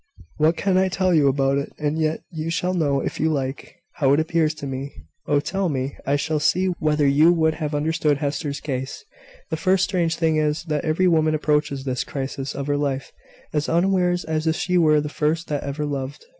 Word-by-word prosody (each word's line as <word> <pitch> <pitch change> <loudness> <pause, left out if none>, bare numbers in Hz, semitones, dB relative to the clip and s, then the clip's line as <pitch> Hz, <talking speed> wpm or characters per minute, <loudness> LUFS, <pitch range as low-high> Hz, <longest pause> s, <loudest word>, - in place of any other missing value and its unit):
"What 155 +2 +3
can 190 -2 +2
I 190 - +3
tell 185 0 +1
you 150 -4 +4
about 135 0 +2
it? 140 - -5
And 150 +1 -1
yet, 155 0 0
you 160 -1 -4
shall 180 +2 -1
know, 145 -6 +1
if - - -4
you 160 +1 +2
like, 135 +2 -4 0.2
how 135 -3 +3
it 145 - +3
appears 160 -1 +1
to 145 - -7
me." 135 +1 -5 0.4
"Oh, 145 - +3
tell 190 +5 -1
me! 135 -1 -2
I 140 - +3
shall 155 +2 0
see 185 +5 +2
whether 150 -2 +2
you 150 +5 +5
would 160 -2 +2
have 150 -1 -2
understood 150 -1 +1
Hester's 145 0 -3
case." 135 - -5 0.5
"The 160 - -1
first 185 +2 +2
strange 170 -4 0
thing 160 -2 +1
is, 150 +1 0
that 150 -3 -2
every 165 +4 +2
woman 155 -2 +3
approaches 150 -2 0
this 130 -2 -2
crisis 135 0 -5
of 140 - -3
her 145 0 0
life 140 -2 -2 0.4
as 150 -1 0
unawares 180 0 +2
as 160 0 -1
if 160 - +2
she 180 +1 -1
were 155 -3 +4
the 150 - -4
first 155 +2 -1
that 145 -2 -1
ever 145 +2 -3
loved." 140 -1 -5
155 Hz, 210 wpm, -23 LUFS, 140-165 Hz, 0.5 s, you